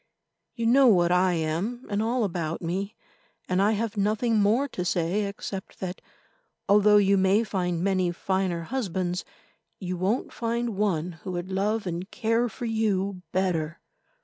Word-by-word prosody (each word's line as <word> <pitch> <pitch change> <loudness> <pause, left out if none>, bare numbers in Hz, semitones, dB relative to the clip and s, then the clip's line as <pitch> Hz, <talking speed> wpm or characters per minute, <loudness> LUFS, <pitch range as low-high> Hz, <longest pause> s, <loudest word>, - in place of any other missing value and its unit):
You 230 - -2
know 260 +3 +6
what 175 -6 +4
I 180 0 +3
am, 170 +10 -2
and 205 0 -1
all 235 +2 +1
about 170 -4 -2
me, 190 +5 -3 0.5
and 185 +1 +1
I 210 +2 +3
have 220 0 -2
nothing 215 +3 +1
more 220 +7 +3
to 180 - -4
say 180 +4 0
except 200 -1 -6
that, 185 0 -5 0.7
although 210 +1 +6
you 200 -1 +4
may 190 +4 +3
find 180 -5 -2
many 185 -2 +1
finer 185 -1 -1
husbands, 185 -5 -2 0.6
you 185 -2 -3
won't 195 +7 -1
find 235 -1 -2
one 180 -5 -1
who 185 - -5
would 175 +2 -4
love 205 +3 0
and 175 +2 -4
care 230 0 0
for 240 +2 -6
you 200 -4 0
better. 170 -4 -1
195 Hz, 155 wpm, -26 LUFS, 180-220 Hz, 0.7 s, know